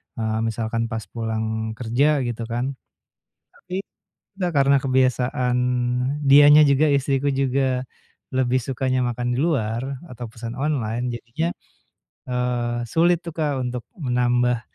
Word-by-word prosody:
eee, 110 -1 -1
misalkan 115 +1 -2
pas 110 -1 -3
pulang 110 -1 -2 0.3
kerja 125 +4 +1 0.2
gitu 120 -1 -4
kan, 120 +3 -2 0.8
tapi, 180 - -9 0.7
gak 180 - +1
karena 140 0 +5
kebiasaan 130 -1 +1 0.7
dianya 145 +2 +8
juga 145 +2 +4
istriku 140 +1 0
juga 135 -1 0 0.5
lebih 130 0 +1
sukanya 130 -1 0
makan 120 +1 -3
di - - -2
luar 120 -8 0 0.3
atau 125 -2 -8
pesan 115 +1 -7
online 125 -5 -1
jadinya, 120 +8 -3 0.8
eee, 125 -1 -1
sulit 175 +2 +4
tuh 170 - -6
Kak, 145 -5 -1
untuk 125 0 -3 0.2
menambah, 125 -4 +1
125 Hz, 120 wpm, -23 LUFS, 120-140 Hz, 0.8 s, dianya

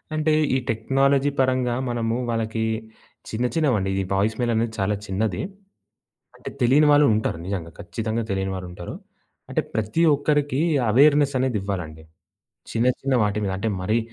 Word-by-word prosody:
అంటే 155 0 +2 0.2
ఈ - - +4
టెక్నాలజీ 135 +5 +2
పరంగా 130 -2 +2
మనము 115 -1 -1
వాళ్ళకి 110 -1 -1 0.7
చిన్న 120 +3 -1
చిన్నవండి 115 -12 +1
ఈ - - -2
వాయిస్ 105 +3 +1
మెయిల్ 120 -1 +1
అనేది 115 0 0
చాలా 100 +2 +1
చిన్నది. 95 -1 -1 1.0
అంటే 125 - -8
తెలియని 135 +5 +5
వాళ్ళు 145 0 +6
ఉంటారు 105 -6 -1
నిజంగా 90 -4 -4
ఖచ్చితంగా 110 +3 -3
తెలియని 95 0 -1
వాళ్ళు 90 -1 -6
ఉంటారు. 90 - -8 0.5
అంటే - - 0
ప్రతి 110 +9 0
ఒక్కరికి 145 -1 0 0.3
ఎవేర్‌నెస్ 145 +3 +5
అనేది 130 -3 0
ఇవ్వాలండి. 85 -6 -5 0.7
చిన్న, 115 +2 +1
చిన్న 135 -1 0
వాటి 105 0 0
మీద 95 - -1
అంటే 110 +3 -2
మరి 110 +5 +1
115 Hz, 150 wpm, -23 LUFS, 100-135 Hz, 1.0 s, వాళ్ళు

